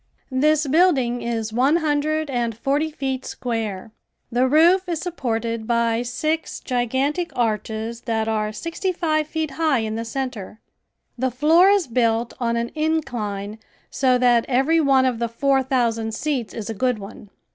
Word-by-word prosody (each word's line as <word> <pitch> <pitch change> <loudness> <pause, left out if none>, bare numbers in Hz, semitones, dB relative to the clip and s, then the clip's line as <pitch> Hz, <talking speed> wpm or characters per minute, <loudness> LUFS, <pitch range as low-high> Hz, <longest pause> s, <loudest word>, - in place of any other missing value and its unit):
This 305 +3 +3
building 275 -6 +2
is 225 -2 -3
one 265 +6 +3
hundred 310 -1 0
and 235 -3 -1
forty 285 +6 0
feet 265 -4 -3
square. 220 -4 -4 0.4
The 250 +2 +2
roof 345 +6 +4
is 335 -3 -1
supported 230 -9 -3
by 235 -1 +1
six 310 +7 -2
gigantic 265 +7 -1
arches 225 0 -2
that 225 -2 -1
are 215 -1 -1
sixty 335 - -3
five 310 -4 0
feet 315 -1 -3
high 305 -4 +1
in 220 -1 -3
the 225 +1 -3
center. 230 -4 -5 0.6
The 260 +1 +1
floor 315 - +4
is 400 -3 +3
built 230 -1 0
on 235 -1 0
an 235 0 -1
incline 240 -10 -2 0.3
so 255 -2 +2
that 245 -2 +4
every 270 +6 +2
one 270 -3 +4
of 250 -3 0
the 235 -1 -1
four 270 +3 +2
thousand 230 -4 0
seats 265 -5 -2
is 220 -3 -5
a 225 - -3
good 250 +2 0
one. 200 0 -11
250 Hz, 155 wpm, -22 LUFS, 230-305 Hz, 0.6 s, roof